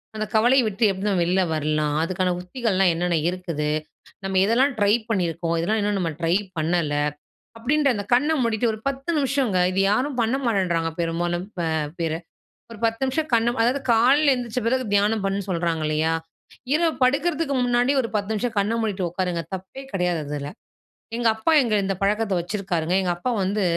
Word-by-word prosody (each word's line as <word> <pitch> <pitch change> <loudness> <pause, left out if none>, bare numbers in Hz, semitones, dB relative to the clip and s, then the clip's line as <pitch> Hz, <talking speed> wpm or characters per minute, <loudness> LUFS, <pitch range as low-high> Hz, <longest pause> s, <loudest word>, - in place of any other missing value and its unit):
அந்த 215 0 -2
கவலைய 245 +4 +5
விட்டு 215 +2 -2
எப்படி 190 +1 -5
தான் 190 -3 +1
வெளியில 185 +2 +2
வரலாம்? 155 -1 0
அதுக்கான 185 +1 0
உத்திகள்லாம் 190 -1 +1
என்னென்ன 175 +1 0
இருக்குது? 170 -5 -3 0.5
நம்ம 190 -1 +1
எதெல்லாம் 255 +6 +3
ட்ரை 205 0 +4 0.2
பண்ணியிருக்கோம்? 170 -5 -1
எதெல்லாம் 210 +7 0
இன்னும் 205 0 0
நம்ம 170 -3 -1
ட்ரை 165 +1 +2 0.2
பண்ணல? 160 -2 0 0.6
அப்டின்ற 280 +5 +1
அந்த 205 -1 -4
கண்ண 280 +6 +3
மூடிட்டு 230 0 +1
ஒரு 215 - -7
10 275 +2 -3
நிமிஷங்க. 270 -7 +1
இது 190 +1 +1
யாரும் 255 +5 0
பண்ண 230 +3 +1
மாட்டேன்றாங்க 180 -7 +1
பெரும்பாலும் 175 +1 -1
இப்ப 175 -5 -4 0.3
பிற. 165 -1 -1 0.6
ஒரு 230 - -9
10 225 +1 -1
நிமிஷம் 305 +4 -1
கண்ண 230 0 +4
அதாவது 255 +4 +1
காலையில 270 +6 +5
எந்திச்ச 245 -1 -3
பிறகு 260 +2 +1
தியானம் 205 +1 +2
பண்ணுன்னு 195 0 -2
சொல்றாங்க 170 -3 -1
இல்லையா? 155 +1 +1 0.6
இரவு 325 +1 +2
படுக்றதுக்கு 285 +2 +1
முன்னாடி 245 +2 +2
ஒரு 230 - -4
10 205 0 -1
நிமிஷம் 225 +1 -2
கண்ண 205 +3 0
மூடிட்டு 200 -5 -1
உட்காருங்க. 175 -1 -2
தப்பே 190 +8 -9
கெடையாது 180 -3 0
அதுல. 145 0 -4 0.7
எங்க 240 -1 +1
அப்பா 220 +9 0
எங்க 235 -4 -1
இந்த 195 0 -1
பழக்கத்த 210 +1 +1
வச்சிருக்காருங்க. 180 -2 -2
எங்க 180 -2 0
அப்பா 245 +8 -2
வந்து 200 +2 0
200 Hz, 170 wpm, -23 LUFS, 175-240 Hz, 0.7 s, கவலைய